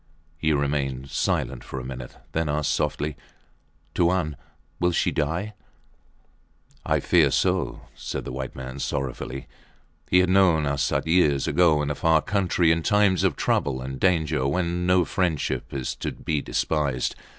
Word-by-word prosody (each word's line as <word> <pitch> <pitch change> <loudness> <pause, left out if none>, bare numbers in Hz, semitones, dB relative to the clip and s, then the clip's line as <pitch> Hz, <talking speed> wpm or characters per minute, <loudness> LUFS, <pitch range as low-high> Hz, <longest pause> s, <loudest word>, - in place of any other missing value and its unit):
He 80 0 0
remained 70 -2 -1
silent - - -1
for 65 - -6
a - - -7
minute, 65 -1 -8
then 80 -1 -1
asked 75 0 0
softly 75 0 -1 0.8
Tuan, 85 -3 +1 0.4
will 90 0 +2
she - - +1
die? 85 +8 -2 1.3
I - - +1
fear - - +4
so, - - 0
said - - -5
the - - -5
white 65 0 -5
man, 65 +1 -7
sorrowfully. 65 -1 -4 0.6
He 90 - +5
had 90 0 +4
known 90 -5 +4
Arsat 70 -1 0
years 80 -5 +3
ago, 80 -4 +3
in 75 - -1
a - - 0
far 80 +2 +2
country 90 -4 +2
in 80 0 +2
times 100 -1 +3
of - - +2
trouble 65 -3 0
and 65 +1 -6
danger, 80 -7 +2
when 90 +3 -1
no 90 -1 +4
friendship 80 0 -1
is 65 -2 -3
to - - -3
be 75 -2 -2
despised. 70 -6 -1
75 Hz, 150 wpm, -25 LUFS, 70-90 Hz, 1.3 s, He